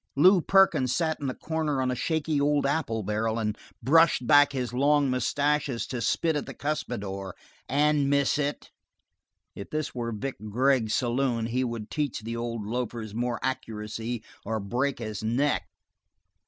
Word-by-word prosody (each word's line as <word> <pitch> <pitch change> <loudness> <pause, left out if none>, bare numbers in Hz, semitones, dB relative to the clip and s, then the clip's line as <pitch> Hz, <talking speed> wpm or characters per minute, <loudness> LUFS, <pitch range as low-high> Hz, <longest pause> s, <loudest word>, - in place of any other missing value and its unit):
Lew 180 +6 +6
Perkins 190 -10 +4
sat 160 -2 0
in 140 - -3
the 130 - -3
corner 155 -3 -2
on 130 -1 +1
a - - -1
shaky 155 +1 0
old 145 0 +2
apple 140 -7 0
barrel 110 +3 -1
and 105 -2 -1 0.3
brushed 155 -1 +4
back 145 +1 +6
his 125 -3 -3
long 140 +1 +3
mustaches 140 +1 0
to 125 -3 -4
spit 160 +7 +1
at 150 - -2
the - - -8
cuspidor 100 -10 -4 0.3
and 145 0 +2
miss 140 +1 +2
it. 145 0 -3 0.8
If 100 - -8
this 155 -1 -3
were 120 -2 -3
Vic 130 +5 -4
Gregg's 125 -1 +2
saloon 120 -2 0
he 125 +3 0
would 115 -3 -5
teach 145 -7 -2
the 115 +2 -5
old 115 -2 -4
loafer 120 0 -3
more 120 +1 -2
accuracy 115 -2 -4 0.2
or 110 +1 -2
break 125 +7 -1
his 110 -3 -5
neck. 130 +7 +1
130 Hz, 160 wpm, -27 LUFS, 115-145 Hz, 0.8 s, Lew